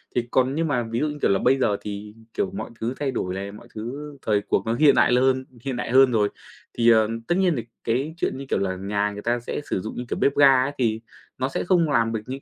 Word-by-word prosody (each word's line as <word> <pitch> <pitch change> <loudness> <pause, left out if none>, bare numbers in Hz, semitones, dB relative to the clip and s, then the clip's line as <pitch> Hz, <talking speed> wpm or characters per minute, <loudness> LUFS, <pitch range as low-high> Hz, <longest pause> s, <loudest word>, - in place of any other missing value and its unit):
Thì 120 -1 0
còn 130 +1 +2
nhưng 165 +1 0
mà 125 -5 0
ví 115 +1 -3
dụ 150 - +1
như 150 0 -5
kiểu - - +3
là 95 - +2
bây 130 +2 +3
giờ 105 -5 +1
thì 105 0 -7 0.2
kiểu 195 - -1
mọi 195 - -6
thứ 115 +3 -2
thay 140 -2 -1
đổi 90 -7 -3
này, 100 +1 -5
mọi 105 +3 -13
thứ 135 +7 -6
thời 105 -2 +1
cuộc 100 0 -1
nó 115 - 0
hiện 140 +3 +5
đại - - +4
hơn 130 +1 +2 0.2
hiện 135 -2 -3
đại 120 - -4
hơn 130 0 +6
rồi, 105 -3 +2 0.5
thì, 120 0 +4
ờ, 110 -2 +5 0.2
tất 175 - +2
nhiên 185 -3 +3
thì 115 - -4 0.2
cái 135 +7 -1
chuyện 150 - -1
như 140 - -7
kiểu - - +1
là 95 -1 -1
nhà 100 +2 -1
người 105 0 -7
ta 120 +2 0
sẽ 120 - -5
sử 95 - -1
dụng 110 - -6
như 125 - -4
kiểu - - -3
bếp 140 - +2
ga 135 -3 +6
ấy 135 - -2
thì 115 -3 0 0.4
nó 130 +1 -1
sẽ - - -2
không 175 -3 +2
làm 115 -5 +2
được 110 - -1
những 130 +2 -6
120 Hz, 280 wpm, -24 LUFS, 110-135 Hz, 0.5 s, hơn